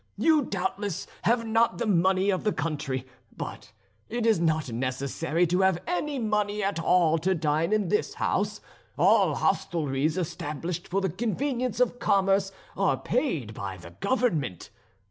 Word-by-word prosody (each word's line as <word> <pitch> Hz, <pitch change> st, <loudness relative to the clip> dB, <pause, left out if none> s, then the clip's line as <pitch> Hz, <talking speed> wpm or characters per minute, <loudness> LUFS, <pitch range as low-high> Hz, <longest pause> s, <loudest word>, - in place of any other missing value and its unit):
You 315 Hz, -2 st, +4 dB
doubtless 195 Hz, -, -3 dB, 0.2 s
have 230 Hz, +1 st, +2 dB
not 225 Hz, +1 st, +2 dB
the 235 Hz, -, -1 dB
money 190 Hz, 0 st, +3 dB
of 185 Hz, -, -1 dB
the 210 Hz, -, +2 dB
country; 140 Hz, -7 st, -3 dB, 0.3 s
but -, -, -7 dB, 0.4 s
it 235 Hz, 0 st, -2 dB
is 220 Hz, -6 st, +4 dB
not 160 Hz, -5 st, 0 dB
necessary 135 Hz, +7 st, -1 dB
to 180 Hz, +3 st, +1 dB
have 190 Hz, -3 st, +3 dB
any 300 Hz, -5 st, -2 dB
money 210 Hz, -3 st, 0 dB
at 195 Hz, -3 st, -1 dB
all 165 Hz, -1 st, +3 dB
to 185 Hz, +4 st, +1 dB
dine 155 Hz, +1 st, 0 dB
in 215 Hz, -1 st, +1 dB
this 425 Hz, +2 st, 0 dB
house. -, -, -1 dB, 0.4 s
All -, -, +4 dB
hostelries 155 Hz, -1 st, 0 dB
established 165 Hz, 0 st, -4 dB
for 195 Hz, +3 st, 0 dB
the 190 Hz, -, 0 dB
convenience 240 Hz, -, -2 dB
of 245 Hz, 0 st, +1 dB
commerce 195 Hz, -2 st, +2 dB, 0.2 s
are 195 Hz, 0 st, +2 dB
paid 170 Hz, -, -1 dB
by 95 Hz, -3 st, -5 dB
the 85 Hz, -1 st, -12 dB
government. 155 Hz, -, -1 dB
190 Hz, 150 wpm, -27 LUFS, 155-220 Hz, 0.4 s, You